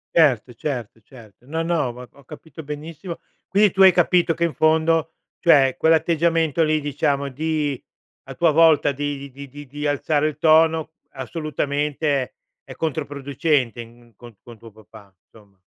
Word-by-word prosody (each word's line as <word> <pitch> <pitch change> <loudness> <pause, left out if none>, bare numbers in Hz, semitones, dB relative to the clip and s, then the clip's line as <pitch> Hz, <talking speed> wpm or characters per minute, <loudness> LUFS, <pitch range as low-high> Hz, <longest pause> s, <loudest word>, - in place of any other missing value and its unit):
Certo, 130 -7 +3
certo, 120 -3 -5
certo. 115 0 -18
No, 160 +3 -3
no, 165 -5 0
ho 125 +1 -8
ho 140 - -20
capito 160 +3 -12
benissimo. 155 +4 -8 0.3
Quindi 200 -1 +3
tu 195 - 0
hai 190 -1 +9
capito 175 -1 +2
che 170 - -2
in 170 -2 0
fondo, 160 0 +1 0.3
cioè 135 -6 +4
quell'atteggiamento 165 0 +1
lì 155 -1 +2
diciamo 140 -1 -1
di 150 -1 -3 0.4
a - - -10
tua 170 -2 +3
volta 155 -2 +4
di 140 0 -5
di 140 +2 -10
di 145 +2 -11
di 145 +2 -5
alzare 145 +1 0
il 150 - -5
tono 160 0 +3 0.2
assolutamente 150 +1 -3
è 130 - -7 0.3
è - - -11
controproducente 140 -4 -2
in 120 0 -16
co 120 0 -14
con 120 -1 -13
tuo 115 -1 -14
papà, 105 -1 -17
insomma. 100 -3 -22
145 Hz, 155 wpm, -21 LUFS, 130-160 Hz, 0.4 s, hai